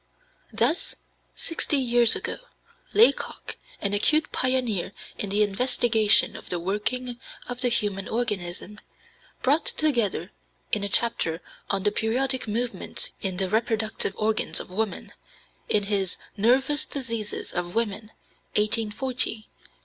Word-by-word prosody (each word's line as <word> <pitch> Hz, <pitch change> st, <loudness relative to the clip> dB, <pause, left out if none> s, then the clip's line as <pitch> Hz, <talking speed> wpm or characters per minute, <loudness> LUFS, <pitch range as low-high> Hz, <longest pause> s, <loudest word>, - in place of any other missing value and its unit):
Thus, -, -, +1 dB, 0.4 s
sixty 320 Hz, -2 st, -1 dB
years 240 Hz, -3 st, +6 dB
ago, -, -, -4 dB, 0.5 s
Laycock, 455 Hz, +3 st, +2 dB, 0.2 s
an 200 Hz, 0 st, 0 dB
acute 305 Hz, +10 st, +3 dB
pioneer 245 Hz, -8 st, 0 dB, 0.3 s
in 205 Hz, -, -2 dB
the 205 Hz, +2 st, +3 dB
investigation 220 Hz, 0 st, +3 dB
of -, -, -10 dB
the 175 Hz, -, -1 dB
working 235 Hz, +7 st, -2 dB, 0.3 s
of 245 Hz, 0 st, -5 dB
the 250 Hz, -, +2 dB
human 205 Hz, -4 st, -1 dB
organism, 210 Hz, -3 st, -3 dB, 0.6 s
brought 295 Hz, +4 st, +2 dB
together 245 Hz, -10 st, 0 dB, 0.4 s
(in 210 Hz, -, 0 dB
a 200 Hz, -, -2 dB
chapter 180 Hz, -7 st, +2 dB, 0.3 s
on 195 Hz, -1 st, -1 dB
"The 205 Hz, -, +2 dB
Periodic 255 Hz, +4 st, +1 dB
Movements 235 Hz, +3 st, -2 dB
in 190 Hz, -2 st, -1 dB
the 190 Hz, 0 st, 0 dB
Reproductive 220 Hz, -1 st, 0 dB
Organs 215 Hz, 0 st, 0 dB
of -, -, -8 dB
Woman," 215 Hz, +2 st, -3 dB, 0.6 s
in 205 Hz, -, +3 dB
his 195 Hz, -2 st, -1 dB, 0.2 s
Nervous 265 Hz, +7 st, +2 dB
Diseases 230 Hz, -6 st, -4 dB
of 175 Hz, +1 st, -3 dB
Women, 215 Hz, -1 st, -2 dB, 0.5 s
1840, 225 Hz, +4 st, +1 dB
pp. 215 Hz, -1 st, -15 dB
220 Hz, 125 wpm, -25 LUFS, 205-245 Hz, 0.6 s, years